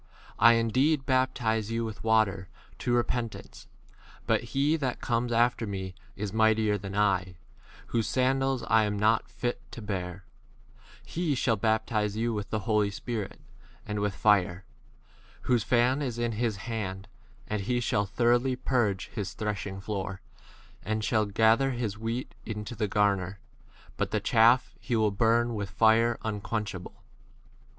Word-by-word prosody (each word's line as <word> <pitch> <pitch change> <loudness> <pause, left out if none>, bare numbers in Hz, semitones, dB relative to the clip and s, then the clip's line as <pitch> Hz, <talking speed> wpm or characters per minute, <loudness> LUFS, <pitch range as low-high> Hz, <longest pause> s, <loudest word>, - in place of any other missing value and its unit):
I 115 - +8
indeed 130 +6 +2
baptize 125 -5 +1
you 115 0 -1
with 110 -2 -7
water 110 -5 +2 0.3
to 120 - +1
repentance, 120 -1 -3 0.6
but - - +1
he 145 +3 +3
that 130 -5 -2
comes 120 0 -1
after 120 -1 +2
me 95 -2 -4 0.2
is 100 -1 -4
mightier 110 -1 +3
than 100 -1 -6
I, 95 -3 +1 0.5
whose 115 -3 0
sandals 130 +1 +1
s - - -8
I 110 -1 +5
am 105 0 -2
not 110 +2 +2
fit 120 0 -3
to - - -7
bear; 95 -3 -5 0.8
he 165 -3 -1
1 - - -1
shall 125 -2 +2
baptize 110 -1 0
you 115 +1 0
with 105 -1 -4
[the] 110 - -2
Holy 105 0 +2
Spirit 110 0 -5 0.4
and 105 -1 -3
with 105 -1 0
12 - - -15
fire: 100 -3 +3 0.8
whose 120 -4 +1
fan 125 +4 +2
is 125 -5 -3
in 120 0 0
his 115 0 -1
hand, 100 -3 -5 0.4
and 105 -1 -2
he 120 +5 0
shall 105 -4 0
thoroughly 120 +4 +2
purge 120 -7 0
his 105 -1 -5
threshing 100 -3 -3
floor, 95 -2 -4 0.6
and 110 +2 -2
shall 110 0 +1
ga 110 +2 +4
ther 135 0 +1
his 115 -5 -3
wheat 115 +3 -3
into 105 +1 -5
the 105 -1 -1
garner, 100 -2 +1 0.6
but - - -1
the - - 0
chaff 120 +3 +4
he 120 - -2
will 110 -2 +2
burn 115 +3 +2
with 100 -2 -3
fire 110 +3 +3
unquenchable. 105 -3 -4
110 Hz, 155 wpm, -28 LUFS, 105-120 Hz, 0.8 s, I